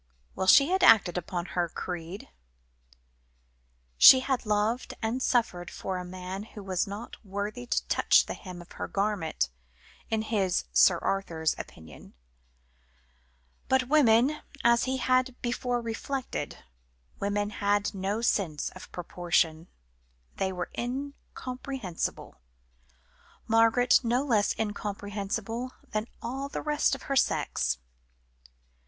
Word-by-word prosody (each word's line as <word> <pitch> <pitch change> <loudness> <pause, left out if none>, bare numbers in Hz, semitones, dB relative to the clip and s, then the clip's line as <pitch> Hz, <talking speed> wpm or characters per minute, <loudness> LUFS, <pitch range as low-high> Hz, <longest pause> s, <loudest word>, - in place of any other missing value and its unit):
Well, 190 - -2
she 280 - +7
had 375 +1 +1
acted 195 -6 +6
up 175 - -13
to 175 -2 -2
her 175 -1 0
creed. 175 +2 -6 1.7
She 260 - +10
had 260 -4 -2
loved 210 +4 0
and 230 +3 -2
suffered 180 -10 0
for 185 -1 -4
a - - -5
man 185 +1 -6
who 210 -1 -10
was 190 -1 -1
not 205 +5 -8
worthy 205 +4 -5
to - - 0
touch - - +4
the - - -4
hem 180 -3 -9
of - - -23
her - - -5
garment, 195 - -1 0.6
in 220 -1 0
his, 200 -5 0
Sir 175 - +6
Arthur's, 165 -5 0
opinion; 75 -6 -11 1.5
but 260 -1 +2
women, 275 0 +4 0.2
as 235 0 +4
he 260 0 -1
had 255 0 +1
before 245 0 -1
reflected, 240 +3 -4 0.6
women 205 +1 -1
had 205 0 0
no 200 +3 -2
sense 170 -10 0
of 185 - -12
proportion; 170 -2 0 0.7
they 190 -1 0
were 180 -1 -5
incomprehensible; 255 -4 -5 1.1
Margaret 230 +2 +4
no 245 +3 +1
less 220 -7 +1
incomprehensible 210 +3 -4 0.2
than 215 +1 -2 0.2
all 265 +4 -4
the - - -5
rest 295 -2 +1
of 270 - -11
her 275 - -2
sex. 65 - +1
210 Hz, 125 wpm, -28 LUFS, 185-245 Hz, 1.7 s, She